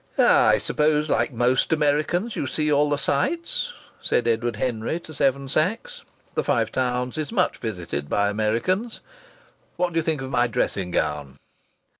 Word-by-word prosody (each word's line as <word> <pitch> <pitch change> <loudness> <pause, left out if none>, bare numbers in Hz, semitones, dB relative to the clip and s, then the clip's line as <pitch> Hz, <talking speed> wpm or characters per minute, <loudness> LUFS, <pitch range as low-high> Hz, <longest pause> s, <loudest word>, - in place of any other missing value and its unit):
"I - - +5
suppose, 150 0 +1
like - - +1
most 125 +4 +1
Americans, 155 +8 +1
you 140 - -2
see 150 +3 0
all 145 0 +3
the 145 - +1
sights," 335 - -1 0.3
said 120 - +1
Edward 115 0 0
Henry 115 +7 -2
to 155 - -11
Seven 140 -1 +1
Sachs 225 - -1 0.3
the - - 0
Five - - +1
Towns 125 +2 -1
is 155 - -3
much 195 -5 +1
visited 90 -10 -4
by 100 0 +2
Americans. 115 - -1 0.7
"What 175 0 -1
do 165 - +2
you - - -1
think 155 -4 -1
of 130 - -6
my 120 -1 +3
dressing 95 -5 -1
gown?" 75 -5 -2
140 Hz, 160 wpm, -24 LUFS, 115-160 Hz, 0.7 s, I